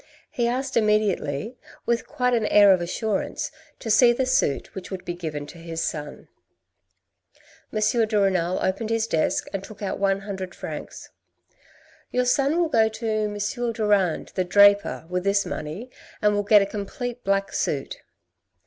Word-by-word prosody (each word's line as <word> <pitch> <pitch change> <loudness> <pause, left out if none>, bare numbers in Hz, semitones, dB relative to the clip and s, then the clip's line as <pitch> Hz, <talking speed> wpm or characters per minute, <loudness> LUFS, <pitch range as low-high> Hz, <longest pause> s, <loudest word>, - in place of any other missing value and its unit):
He 240 -1 0
asked 260 +3 -2
immediately, 210 - 0 0.3
with 235 0 0
quite 250 -1 0
an 225 -3 +1
air 205 -1 +7
of 185 - 0
assurance, 200 +4 -2 0.3
to 225 - -4
see 240 +2 +6
the 255 +2 0
suit 255 - 0
which 190 - -8
would 190 -2 -7
be 175 - -3
given 155 -4 -5
to 170 - -12
his 165 0 -6
son. 150 -1 -5 1.4
M. 220 +1 +2
de 210 -1 +1
Renal 185 -3 +1
opened 215 +4 -1
his 225 -1 +1
desk 160 -8 0
and 195 -1 -3
took 210 0 -10
out 195 - -3
one 195 0 +1
hundred 190 -2 -6
francs. - - -8 1.0
"Your 250 0 0
son 275 +5 +2
will 345 -2 +2
go 220 -6 +3
to 220 +1 -6
M. 215 -1 -1 0.4
Durand, 205 -6 +1
the 185 - 0
draper, 200 -1 +4
with 180 +1 -2
this 200 0 +2
money 170 +12 -6 0.3
and 210 0 +3
will 205 - +1
get 205 0 +5
a - - -1
complete 240 +5 -5
black 195 0 0
suit." 140 -2 -2
205 Hz, 165 wpm, -24 LUFS, 185-225 Hz, 1.4 s, air